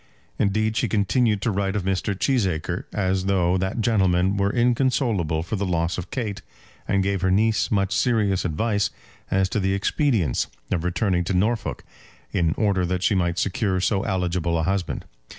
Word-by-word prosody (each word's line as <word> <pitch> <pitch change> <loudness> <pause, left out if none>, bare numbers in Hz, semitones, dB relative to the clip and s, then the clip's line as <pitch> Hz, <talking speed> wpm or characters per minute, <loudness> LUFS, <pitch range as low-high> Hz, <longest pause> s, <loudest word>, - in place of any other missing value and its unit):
Indeed, 110 +2 +1
she - - +1
continued 105 0 +1
to 115 - +1
write 100 0 -1
of 100 - -1
Mr. 95 +1 -1
Cheesacre 95 - 0
as 95 -2 0
though 90 -2 +2
that 95 +5 -2
gentleman 95 -4 +2
were 100 0 +1
inconsolable 120 - +1
for 105 +5 -3
the 100 - -2
loss 85 0 0
of 90 - -7
Kate, 105 -7 -3 0.5
and 100 -1 +2
gave 100 -1 -1
her 95 - +2
niece 110 +4 +2
much 100 -2 +1
serious 105 -4 +1
advice 100 +5 0 0.4
as 95 0 +2
to 110 - -1
the 95 0 +1
expedience 100 - +1 0.2
of 85 - 0
returning 90 0 0
to 95 - -1
Norfolk, 110 +4 0 0.5
in 80 -2 +1
order 100 -4 +1
that 90 +1 -1
she 105 - +3
might 85 -2 0
secure 95 0 0
so 95 +1 +1
eligible 90 -4 -1
a 80 - 0
husband. 95 0 -2
95 Hz, 170 wpm, -23 LUFS, 90-110 Hz, 0.5 s, she